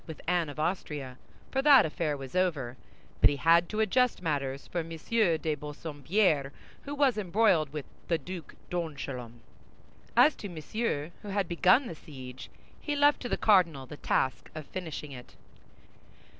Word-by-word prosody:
with 160 -3 -8
Anne 175 -2 +1
of 145 - -8
Austria—for 150 - -4
that 275 -2 +7
affair 155 -1 -2
was 135 +1 -9
over—but 145 -10 0
he 145 - -1
had 170 +3 +4
to 215 - -3
adjust 250 +3 +2
matters 140 -4 -2
for 175 - -3
M. 165 0 -5
de 165 -2 +1
Bassompierre, 150 +1 0 0.3
who 285 0 -4
was 275 -6 +2
embroiled 185 -6 +2
with 150 -2 -5 0.2
the 165 - +2
Duc 180 -1 -8 0.2
d'Angoulême. 135 -8 -5 0.8
As 275 +5 +7
to 205 - -6
Monsieur, 165 -1 -3
who - - -10
had 200 -2 -1
begun 185 +10 +4
the 170 - -5
siege, 130 -5 -10 0.3
he 295 - -2
left 290 0 +4
to 245 - -4
the - - 0
cardinal 170 -10 +3
the 145 +3 -10
task 130 -2 -1
of 155 -2 -6
finishing 160 -4 -6
it. 125 -2 -11
165 Hz, 155 wpm, -29 LUFS, 145-200 Hz, 0.8 s, that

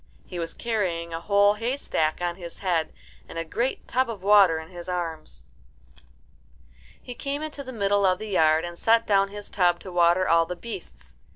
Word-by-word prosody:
He 180 - -7
was 165 -1 -3
carrying 180 -8 -2
a 165 - -3
whole 200 +2 +4
haystack 210 - -1
on 175 -1 -1
his 175 -2 -9
head 170 -5 -1 0.4
and - - -8
a 165 - -2
great 240 +10 -2
tub 255 -1 +1
of 210 -5 -6
water 200 -5 +6
in 160 0 -8
his 175 -1 -9
arms. 160 - -5 1.6
He 245 - -8
came 280 +4 -4
into 295 -2 -6
the 260 - -8
middle 200 -3 +1
of 185 -1 +3
the 215 +2 -7
yard, 160 -3 +3
and 175 0 -8
set 230 0 +3
down 195 -1 +3
his 205 +1 -9
tub 175 -3 +2
to 185 - -9
water 175 +1 +3
all 165 0 +4
the 180 - -4
beasts. 230 +6 -10
185 Hz, 190 wpm, -25 LUFS, 170-210 Hz, 1.6 s, water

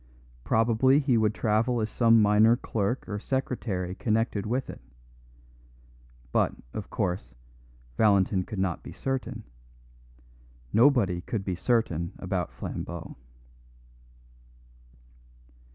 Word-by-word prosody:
Probably 115 - +3
he 140 -4 +2
would 110 -1 +2
travel 115 +2 +1
as 110 - 0
some 115 0 +4
minor 105 +3 +5
clerk 110 +3 -2
or 105 - -4
secretary 110 -8 -2
connected 105 0 -1
with 125 +4 -1
it; - - -9 1.5
but, - - +1 0.2
of 105 - -6
course, 90 - -3 0.6
Valentin 100 -3 +3
could 105 - -7
not 95 -3 -1
be - - -10
certain; 135 -1 -4 1.3
nobody 110 -7 +4
could 100 +1 -4
be 95 - -1
certain 90 -4 0
about - - -3
Flambeau. 85 -1 -6
110 Hz, 105 wpm, -27 LUFS, 95-120 Hz, 1.5 s, minor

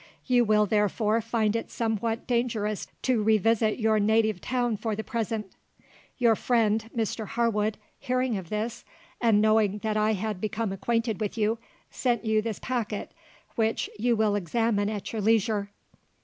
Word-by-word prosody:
You 250 -2 +4
will, 210 0 +4
therefore, 210 +2 +1
find 225 -1 0
it 230 - -3
somewhat 225 0 -2
dangerous 230 -4 -1 0.2
to 250 -4 +2
revisit 220 +1 +2
your 220 -2 +2
native 215 -2 +2
town 245 -3 0
for 220 0 -2
the 220 - -4
present. 225 -4 -3 0.7
Your 235 -3 +4
friend 225 -2 +1
Mr 220 -1 -2
Harwood 220 -2 0 0.2
hearing 255 -3 0
of 185 -4 -6
this, 220 +3 -3 0.4
and 225 -3 +4
knowing 215 -1 +3
that 215 -1 0
I 215 +1 +2
had 210 -1 -3
become 215 -1 -2
acquainted 225 +2 -1
with 210 +1 -2
you, 220 +1 +1 0.3
sent 240 -2 0
you 220 0 +2
this 220 -2 -3
packet, 230 -5 -3 0.4
which 225 -1 0
you 240 +2 +2
will 215 -1 +2
examine 205 +2 0
at 210 0 -5
your 220 - -2
leisure. 215 -1 +2
220 Hz, 155 wpm, -27 LUFS, 210-230 Hz, 0.7 s, You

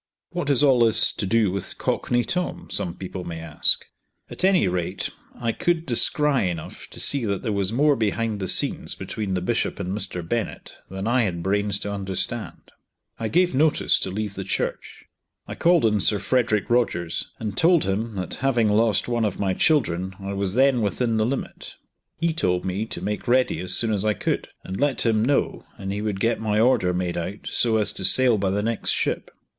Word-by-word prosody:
"What 175 -3 -3
has 145 0 +3
all 135 -4 +5
this 115 -1 +5
to 100 - -3
do 110 -1 +2
with 100 0 -4
Cockney 120 0 0
Tom?" 180 +2 -3
some 85 -1 -2
people 95 -1 -6
may 85 -2 -6
ask. 80 -2 +1 0.5
At - - -7
any 190 - +4
rate 90 +1 -2 0.2
I 115 -2 -1
could 170 +5 0
descry 135 - +3
enough 85 -3 -7
to - - -10
see 140 -3 0
that 100 -2 -2
there 110 - -1
was 100 -1 -1
more 145 +5 +3
behind 110 -1 -1
the 95 - -3
scenes - - +1
between 100 -4 -4
the 90 - -1
Bishop - - -1
and 95 +2 -3
Mr. 90 -5 -5
Bennett 115 +3 -3
than 95 +1 -5
I 120 +3 +2
had 85 -4 -3
brains 100 0 +1
to 100 - -3
understand. 95 -2 -2 0.5
I 115 - -2
gave 180 +8 +2
notice 150 +3 +3
to - - -2
leave 105 +1 -4
the 95 - -5
church. - - -4 0.4
I - - -5
called 170 -5 +3
on 105 -1 +2
Sir 105 +2 +4
Frederick 115 -2 +1
Rogers 85 -9 0
and 105 -3 -5
told 170 0 +4
him 105 +3 -2
that 95 -1 -4
having 120 -5 +2
lost 110 +1 +2
one 120 -1 0
of 105 - -2
my 95 -2 +1
children 95 - +1
I 100 0 -5
was 100 0 -1
then 130 -1 +4
within 110 +2 0
the 110 0 +2
limit. 135 +2 -5 0.4
He 165 0 0
told 90 - 0
me 95 +4 -2
to - - -7
make 105 0 -3
ready 130 +1 +2
as 90 0 -2
soon 115 -2 0
as 100 -1 -1
I 105 -1 +1
could, - - -2 0.2
and 95 - -6
let 145 -3 +1
him 110 -2 +2
know, 140 +4 0
and 95 0 -4
he 105 - -3
would 105 -3 -2
get 115 +3 +1
my 105 -1 0
order 110 -6 +3
made 90 -1 -2
out 95 +5 -5
so 115 -2 +1
as 105 - 0
to - - -7
sail 120 +3 +4
by 95 -1 0
the 100 +2 -1
next 115 0 -1
ship. - - 0
105 Hz, 205 wpm, -24 LUFS, 95-125 Hz, 0.5 s, all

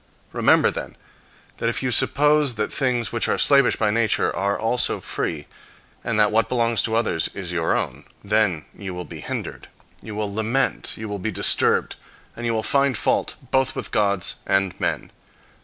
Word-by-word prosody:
Remember, - - +4
then, - - -7 0.6
that 115 - 0
if 120 - -3
you 130 - 0
suppose 150 +2 +3
that 105 0 -2
things 125 -6 0
which - - 0
are - - +1
slavish 140 -3 +4
by 105 -2 +1
nature 115 0 +1
are 100 +3 0
also 115 +3 +1
free, 75 -2 -4 0.6
and 110 -2 -1
that 105 -1 +4
what 115 +1 +2
belongs 115 -3 +1
to 110 - -1
others 110 -8 0
is 95 -3 -5
your 85 -2 +1
own, - - -4 0.2
then 100 -6 +1
you 95 -3 -7
will 90 0 -6
be 80 - -9
hindered. - - -6 0.3
You 110 - -8
will 105 -1 -3
lament, 115 +4 -1
you 110 - -6
will 105 -1 -5
be 100 - -2
disturbed, 100 - +1 0.4
and 120 0 -4
you 115 - 0
will 110 - -1
find 140 -2 +2
fault - - 0 0.2
both 130 0 +1
with - - -5
gods 100 -3 0
and 95 -2 +1
men. - - -2
110 Hz, 180 wpm, -22 LUFS, 100-120 Hz, 0.6 s, Remember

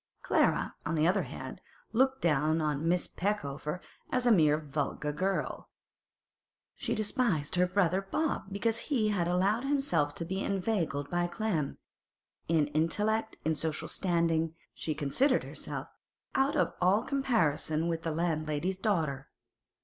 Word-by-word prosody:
Clara, - - +2
on 165 - -1
the 155 0 +3
other 190 +2 +3
hand, 130 +2 -7 0.3
looked 265 +3 +2
down 155 0 +3
upon 150 0 0
Miss 175 +1 +2
Peckover 175 -4 -2 0.3
as 250 -1 +1
a 240 - +6
mere 155 -7 +5
vulgar 150 -1 -2
girl; 190 +6 -2 1.0
she - - -2
despised 205 - 0
her 180 0 +3
brother 185 0 +2
Bob 290 +11 -1
because 225 +3 0
he 230 -7 +2
had 180 -5 +1
allowed 195 +7 +2
himself 275 - +1
to 170 - -4
be 190 +3 -2
inveigled 180 -8 -1
by 175 0 +1
Clem; 175 -7 -2 0.7
in 160 -2 +3
intellect, 210 +9 0
in 160 - +3
social 155 +1 -2
standing, 165 -3 +1 0.2
she 155 - -3
considered 255 - +2
herself - - -6 0.5
out 270 +1 +2
of - - +2
all 190 +5 +4
comparison 170 - +1
with 165 -1 -1
the 165 - -2
landlady's 160 +2 -1
daughter. 160 -10 0
175 Hz, 140 wpm, -31 LUFS, 155-210 Hz, 1.0 s, a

